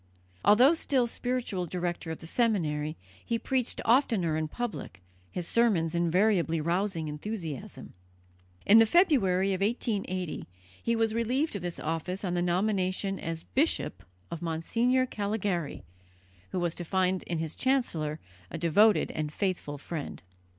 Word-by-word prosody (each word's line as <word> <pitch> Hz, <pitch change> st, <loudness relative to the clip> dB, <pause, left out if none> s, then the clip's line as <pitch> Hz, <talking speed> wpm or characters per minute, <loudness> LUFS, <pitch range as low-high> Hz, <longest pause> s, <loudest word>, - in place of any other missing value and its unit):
Although 245 Hz, +9 st, +6 dB
still 275 Hz, -6 st, +1 dB
spiritual 235 Hz, -7 st, -2 dB
director 175 Hz, -1 st, -3 dB
of 160 Hz, -, -4 dB
the -, -, -10 dB
seminary, 160 Hz, -8 st, 0 dB, 0.3 s
he 230 Hz, -, -1 dB
preached 255 Hz, +1 st, -1 dB
oftener 225 Hz, -, +3 dB
in 155 Hz, 0 st, -1 dB
public, 215 Hz, -, -5 dB, 0.3 s
his 175 Hz, -2 st, -3 dB
sermons 200 Hz, -9 st, +2 dB
invariably 170 Hz, 0 st, +2 dB
rousing 170 Hz, 0 st, -1 dB
enthusiasm. 160 Hz, -, -6 dB, 0.7 s
In 215 Hz, +3 st, +8 dB
the 225 Hz, -, +6 dB
February 195 Hz, -, +3 dB
of 190 Hz, -, -3 dB
1880 195 Hz, -5 st, -1 dB, 0.3 s
he 235 Hz, -, +1 dB
was 225 Hz, -1 st, +1 dB
relieved 245 Hz, +5 st, 0 dB
of 200 Hz, -, -3 dB
this 175 Hz, -1 st, -4 dB
office 165 Hz, +5 st, -3 dB
on 180 Hz, -, -1 dB
the 175 Hz, -, 0 dB
nomination 190 Hz, +1 st, 0 dB
as 165 Hz, 0 st, -4 dB
bishop 305 Hz, +5 st, 0 dB, 0.3 s
of 170 Hz, -, -5 dB
Monsignor 230 Hz, +11 st, +1 dB
Callegari, 200 Hz, -, -2 dB, 0.7 s
who 185 Hz, -, -1 dB
was 175 Hz, -2 st, 0 dB
to 175 Hz, -, -5 dB
find 185 Hz, +1 st, +1 dB
in 170 Hz, -, -2 dB
his 160 Hz, -1 st, -3 dB
chancellor 165 Hz, -, 0 dB, 0.3 s
a -, -, -5 dB
devoted 170 Hz, +2 st, +4 dB
and 155 Hz, -1 st, -3 dB
faithful 175 Hz, -5 st, -2 dB
friend. 150 Hz, +1 st, -6 dB
185 Hz, 140 wpm, -29 LUFS, 165-225 Hz, 0.7 s, In